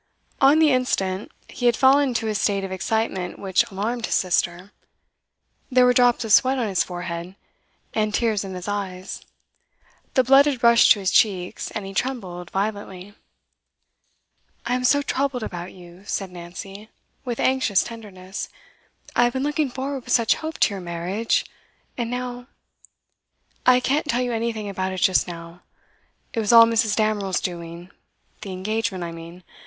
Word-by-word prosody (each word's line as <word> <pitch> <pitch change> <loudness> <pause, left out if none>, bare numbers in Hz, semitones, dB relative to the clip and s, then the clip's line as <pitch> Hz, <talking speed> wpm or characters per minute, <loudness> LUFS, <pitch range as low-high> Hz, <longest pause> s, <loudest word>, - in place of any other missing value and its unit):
On 275 +3 +6
the 315 -2 +5
instant, 195 -7 -1 0.2
he 245 - -2
had 235 - +3
fallen 275 +1 +5
into 230 -2 -2
a 215 - 0
state 200 -1 0
of 190 - -5
excitement 190 -1 -2
which 190 -2 +2
alarmed 220 +4 -3
his - - 0
sister. 180 +1 0 1.0
There 250 0 +5
were 250 - +5
drops 245 -1 +3
of 215 - +1
sweat 260 +4 +5
on 240 -3 0
his 190 -3 +1
forehead, 175 0 -6 0.6
and 215 -1 0
tears 215 -2 0
in 190 -1 -7
his 180 +1 -7
eyes; 190 -2 -4 0.9
the 260 - +5
blood 270 +3 +6
had 265 -5 -2
rushed 235 0 +6
to 210 - -7
his 190 -1 0
cheeks, 185 -4 +1
and 210 -3 -5
he 195 - -7
trembled 190 -7 -3
violently. 200 -1 -4 1.5
'I 240 - -1
am 250 0 -1
so 285 +3 +4
troubled 275 -3 -1
about 175 -2 -6
you,' 180 0 -15
said 195 -2 -3
Nancy, 185 +4 -9 0.3
with 245 -4 -4
anxious 260 -7 +2
tenderness. 200 -4 -8 0.7
'I 240 - +5
have 240 - 0
been 260 0 -2
looking 295 0 0
forward 265 0 -5
with - - -13
such 230 -2 +3
hope 315 0 -6
to 205 - +4
your 195 - -6
marriage, 175 +6 -1 0.5
and 235 -2 -3
now 245 0 -5 0.6
' - - -44
'I 250 0 +7
can't 285 +4 0
tell 245 +2 +1
you 245 -1 -2
anything 225 -2 -2
about 190 -1 -3
it 185 - -5
just 185 0 +3
now. 170 0 -9 0.7
It 230 - -1
was 215 0 +1
all 230 -1 +9
Mrs. 225 -2 +1
Damerel's 210 -4 0
doing; 170 0 -6 0.5
the 195 - -6
engagement, 195 0 -2
I 170 - -5
mean. 165 +2 -11
210 Hz, 170 wpm, -23 LUFS, 185-245 Hz, 1.5 s, all